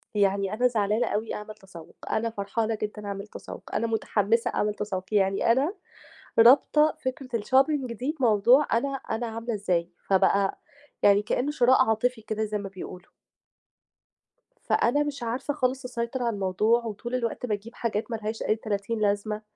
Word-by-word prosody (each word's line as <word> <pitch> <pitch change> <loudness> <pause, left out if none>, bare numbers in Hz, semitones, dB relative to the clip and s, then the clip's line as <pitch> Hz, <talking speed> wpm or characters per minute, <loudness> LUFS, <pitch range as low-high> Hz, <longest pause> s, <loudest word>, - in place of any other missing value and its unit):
يعني 200 -1 +1
أنا 245 +3 +3
زعلانة 215 -1 +1
أوي 220 +2 -2
أعمل 210 0 -8
تسوُّق، 190 -6 -14 0.2
أنا 225 +1 0
فرحانة 220 +1 -2
جدًا 210 0 -4
أعمل 200 0 -5
تسوُّق، - - -10
أنا 230 - +1
مُتحمِّسة 225 0 +1
أعمل 210 0 +1
تسوُّق. 195 -3 -4
يعني 195 +2 +3
أنا 275 +9 +2 0.7
رابطة 290 +6 +6
فكرة 260 +1 -3
الshopping 270 +4 +2
دي 260 +8 -3
بموضوع 240 +4 +5
أنا 235 +5 +1 0.2
أنا 235 +2 -1
عاملة 230 +1 -4
إزاي، 180 -5 0 0.2
فبقى 195 0 +3 0.4
يعني 200 0 +6
كإنّه 250 +6 -1
شِراء 260 -2 +4
عاطفي 225 +2 0
كده 215 0 -3
زي 210 0 -2
ما 200 -1 -6
بيقولوا. 185 -1 -10 1.5
فأنا 290 +5 +2
مش 285 -4 -5
عارفة 245 +5 -2
خالص 260 -2 -1
أسيطر 245 +1 -3
على 235 -1 0
الموضوع 210 +5 +1
وطول 230 +3 -4
الوقت 235 0 -2
باجيب 220 +1 -4
حاجات 225 0 -2
ما - - 0
لهاش 220 0 -4
أي 215 - +2
تلاتين 215 0 -3
لازمة 210 +1 0
220 Hz, 155 wpm, -26 LUFS, 205-245 Hz, 1.5 s, رابطة